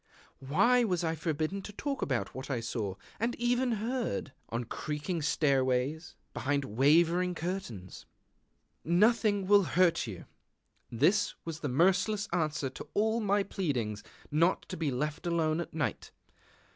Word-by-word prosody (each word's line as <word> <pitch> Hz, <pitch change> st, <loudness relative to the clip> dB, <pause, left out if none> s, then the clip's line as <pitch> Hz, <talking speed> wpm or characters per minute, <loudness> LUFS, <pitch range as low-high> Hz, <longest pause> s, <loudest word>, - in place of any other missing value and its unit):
Why 200 Hz, -, +3 dB
was 180 Hz, -6 st, 0 dB
I 160 Hz, -1 st, 0 dB
forbidden 160 Hz, +4 st, -2 dB
to 210 Hz, -, -8 dB
talk 275 Hz, +6 st, -4 dB
about 130 Hz, -4 st, -1 dB
what 130 Hz, +3 st, -7 dB
I 130 Hz, -4 st, 0 dB
saw, 110 Hz, -4 st, -3 dB, 0.2 s
and 230 Hz, +3 st, 0 dB
even 245 Hz, +1 st, +1 dB
heard, 230 Hz, -, -2 dB, 0.2 s
on 115 Hz, +2 st, -2 dB
creaking 150 Hz, -, -3 dB
stairways, 140 Hz, +1 st, +1 dB, 0.2 s
behind 140 Hz, 0 st, -1 dB
wavering 165 Hz, -, +3 dB
curtains? 160 Hz, -, -5 dB, 0.8 s
"Nothing 205 Hz, +3 st, +3 dB
will 205 Hz, +1 st, +6 dB
hurt 175 Hz, -5 st, +2 dB
you," 95 Hz, -5 st, -7 dB, 0.6 s
this 170 Hz, -, +2 dB
was 165 Hz, -1 st, -5 dB
the 150 Hz, -, -3 dB
merciless 190 Hz, -, +2 dB
answer 155 Hz, -5 st, 0 dB
to -, -, -9 dB
all 220 Hz, +2 st, +2 dB
my 205 Hz, -2 st, +2 dB
pleadings 125 Hz, -, -2 dB, 0.3 s
not 165 Hz, +5 st, +2 dB
to -, -, -4 dB
be 160 Hz, -2 st, -1 dB
left 150 Hz, +6 st, -3 dB
alone 165 Hz, -1 st, +1 dB
at -, -, -7 dB
night. 155 Hz, -1 st, -3 dB
165 Hz, 140 wpm, -31 LUFS, 140-200 Hz, 0.8 s, will